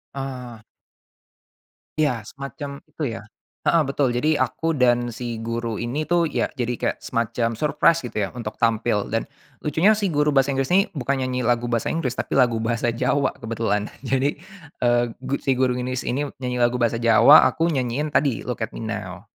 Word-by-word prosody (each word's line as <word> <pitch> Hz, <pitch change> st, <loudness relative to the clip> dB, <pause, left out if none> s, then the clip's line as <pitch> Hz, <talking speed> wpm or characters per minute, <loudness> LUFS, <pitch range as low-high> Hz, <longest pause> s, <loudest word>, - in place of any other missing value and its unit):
Ah. 125 Hz, -4 st, -6 dB, 1.4 s
Iya, 125 Hz, -8 st, 0 dB
semacam 140 Hz, +1 st, -7 dB, 0.2 s
itu 155 Hz, -, -5 dB
ya. 110 Hz, -, -8 dB, 0.4 s
Heeh, 170 Hz, -, +4 dB
betul, 140 Hz, 0 st, +1 dB
jadi 125 Hz, +6 st, +1 dB
aku 165 Hz, 0 st, -2 dB
dan 120 Hz, -1 st, +3 dB
si 120 Hz, -2 st, -4 dB
guru 115 Hz, -1 st, -3 dB
ini 125 Hz, +6 st, -2 dB
tuh 175 Hz, +1 st, +2 dB, 0.2 s
ya -, -, +2 dB
jadi 120 Hz, 0 st, 0 dB
kayak -, -, -1 dB
semacam 115 Hz, 0 st, -1 dB
surprise 155 Hz, +4 st, +3 dB
gitu 120 Hz, -, -7 dB
ya 95 Hz, -, -2 dB
untuk 110 Hz, -3 st, -5 dB
tampil 115 Hz, -2 st, +1 dB
dan -, -, 0 dB, 0.4 s
lucunya 180 Hz, +9 st, +3 dB
si 210 Hz, -, -1 dB
guru 150 Hz, +1 st, +2 dB
bahasa 135 Hz, +1 st, +3 dB
Inggris 135 Hz, 0 st, -1 dB
ini 195 Hz, +2 st, +5 dB
bukan 140 Hz, -2 st, -1 dB
nyanyi 130 Hz, -1 st, -1 dB
lagu 120 Hz, 0 st, +1 dB
bahasa 115 Hz, -2 st, 0 dB
Inggris 160 Hz, -7 st, -1 dB
tapi 130 Hz, -, -2 dB
lagu 120 Hz, -3 st, +3 dB
bahasa 115 Hz, +1 st, 0 dB
Jawa 140 Hz, +4 st, +1 dB
kebetulan, 110 Hz, -2 st, -1 dB, 0.2 s
jadi, 135 Hz, +3 st, 0 dB, 0.5 s
eee, 120 Hz, 0 st, +4 dB
gu 130 Hz, +1 st, -3 dB
si 135 Hz, -, +1 dB
guru 130 Hz, -1 st, +2 dB
Inggris 125 Hz, 0 st, -3 dB
ini 140 Hz, +3 st, -1 dB
nyanyi 125 Hz, -1 st, -2 dB
lagu 120 Hz, +1 st, +3 dB
bahasa 115 Hz, -1 st, +1 dB
Jawa, 115 Hz, +6 st, +8 dB
aku 165 Hz, -, -1 dB
nyanyiin 135 Hz, +3 st, -1 dB
tadi, 135 Hz, -6 st, +1 dB
Look 125 Hz, -2 st, -4 dB
at 110 Hz, -, -1 dB
Me -, -, -6 dB
Now. 105 Hz, -3 st, -6 dB
125 Hz, 180 wpm, -23 LUFS, 115-140 Hz, 1.4 s, Jawa